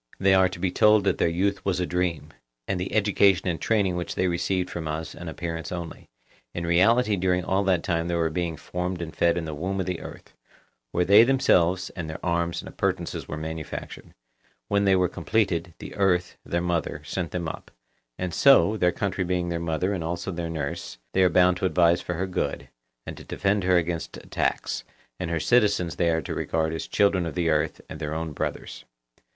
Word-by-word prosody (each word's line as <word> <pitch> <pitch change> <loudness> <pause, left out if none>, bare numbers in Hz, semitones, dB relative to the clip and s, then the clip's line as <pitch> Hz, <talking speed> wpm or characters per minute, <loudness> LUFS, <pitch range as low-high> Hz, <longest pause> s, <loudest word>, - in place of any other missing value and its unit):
They 95 0 +4
are 95 -1 +5
to 95 - -8
be 90 0 -1
told 105 +2 +5
that 95 -2 +1
their - - +3
youth 100 +4 0
was 95 -2 0
a 90 - 0
dream, 90 -3 -2 0.4
and 95 - -1
the 90 - -3
education 100 -3 +3
and 85 -2 -2
training 100 -5 +1
which 90 0 -4
they 95 - +1
received 90 +1 0
from 85 -3 -5
us, 80 +1 -4
an 85 - -9
appearance 80 0 -5
only; 85 -7 -7 0.5
in 85 - -3
reality 105 +6 +4
during 90 -1 0
all 95 +1 +1
that 90 -3 +2
time 85 -1 -1
they 85 - -1
were 80 -1 +1
being 85 -1 -2
formed 90 0 -4
and 80 -2 -6
fed 85 0 +2
in 85 - -2
the 80 - -5
womb 95 +6 -3
of 95 - -1
the 90 -2 -3
earth, - - -11 0.6
where 90 0 +1
they 100 +4 +8
themselves 95 -8 +2
and 85 -4 -6
their 80 - -5
arms 85 -1 -1
and - - -10
appurtenances - - -2
were 75 - -5
manufactured; 80 0 -7 0.5
when 100 0 +2
they 95 -1 +5
were 90 -1 +3
completed, 90 -5 -1
the - - -9
earth, 90 -3 +1
their 85 - -1
mother, 85 -4 -2
sent 85 +2 -3
them 85 -2 -3
up; - - -7 0.5
and 90 -2 -3
so, 135 -6 +5
their 90 -3 +3
country 95 0 -2
being 90 -1 -1
their 85 -1 -2
mother 85 +4 -1
and 90 -4 -3
also 85 +3 -3
their 85 -1 -4
nurse, 70 -6 -4 0.2
they 95 - +3
are 90 - +5
bound 90 +1 +4
to - - -2
advise 85 -1 +3
for 90 - -4
her 90 +3 -1
good, 95 - -3 0.4
and - - -7
to - - -10
defend 100 0 0
her 90 0 +4
against 85 -1 -2
attacks, - - -2 0.4
and 90 -2 -3
her 85 -1 0
citizens 100 -6 +2
they 85 -2 +2
are 80 -1 0
to - - -4
regard 80 0 -1
as 80 - -4
children 100 -3 +2
of 80 -3 -5
the 85 -2 +1
earth 75 0 0
and 75 - -8
their 75 -1 -3
own 80 0 -3
brothers. 75 - -5
90 Hz, 215 wpm, -25 LUFS, 85-95 Hz, 0.6 s, they